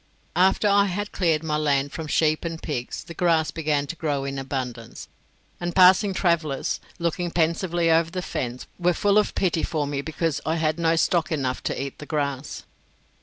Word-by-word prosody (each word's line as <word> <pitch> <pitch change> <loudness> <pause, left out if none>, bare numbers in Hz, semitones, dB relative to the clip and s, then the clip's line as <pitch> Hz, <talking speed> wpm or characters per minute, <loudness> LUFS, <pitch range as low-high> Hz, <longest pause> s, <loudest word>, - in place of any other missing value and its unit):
After 190 +4 +3
I 200 0 +5
had 205 +2 -3
cleared 165 -4 +1
my 155 -1 0
land 145 -2 +1
from 160 -1 -6
sheep 155 0 +2
and 165 -1 -4
pigs, 125 -7 -4
the 170 - -9
grass 165 -2 +2
began 150 -3 0
to 165 - -6
grow 145 -3 -2
in 140 0 -3
abundance; 125 -4 -5 0.5
and 175 -1 -3
passing 185 +2 +6
travellers, 170 -7 0 0.2
looking 170 0 -1
pensively 170 0 +1
over 165 0 +3
the 180 +1 -4
fence, 125 -5 -4
were 175 0 +2
full 205 +3 +3
of 210 - -1
pity 175 -4 +1
for 155 -3 -1
me 140 -1 -2
because 160 0 -2
I 160 +3 0
had 160 0 0
not 165 0 +2
stock 170 -1 +1
enough 135 -5 -1
to - - -2
eat 135 0 -5
the 150 - -9
grass. 140 -2 -3
160 Hz, 185 wpm, -24 LUFS, 145-175 Hz, 0.5 s, passing